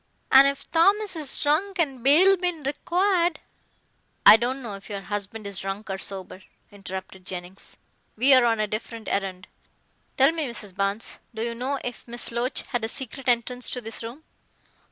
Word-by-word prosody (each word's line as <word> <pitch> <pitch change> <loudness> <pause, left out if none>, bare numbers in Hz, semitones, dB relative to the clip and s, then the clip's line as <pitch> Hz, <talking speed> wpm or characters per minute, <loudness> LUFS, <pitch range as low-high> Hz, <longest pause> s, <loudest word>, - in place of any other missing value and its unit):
"An' 270 +1 +8
if 280 0 -3
Thomas 395 +4 +3
is 300 -4 +1
drunk 355 +7 +1
and 275 -7 -1
bail 345 +9 +6
bein' 355 -4 -3
required 350 +3 +1 0.5
" - - -43
"I - - +10
don't 255 +4 -2
know 220 -4 -5
if 195 +1 -11
your 200 -1 -4
husband 205 +2 -5
is 200 -2 -4
drunk 195 +2 -5
or 190 - -4
sober," 190 -1 -6 0.3
interrupted 190 -1 -8
Jennings. 180 +1 -9 0.4
"We 260 +5 +5
are 255 -2 +6
on 225 -2 +2
a 215 - +2
different 220 +1 -6
errand. 190 -1 -3 0.7
Tell 270 +3 +6
me, 320 -3 -2
Mrs. 210 -6 -6
Barnes, 200 +2 -1 0.2
do 220 - -2
you 235 0 -2
know 255 +4 -2
if 245 0 -7
Miss 240 0 -3
Loach 240 +3 -1
had 245 -3 -3
a - - 0
secret 265 +1 -5
entrance 245 +1 +1
to 250 - -3
this 225 -2 -7
room?" 235 +7 -8
240 Hz, 180 wpm, -25 LUFS, 205-285 Hz, 0.7 s, I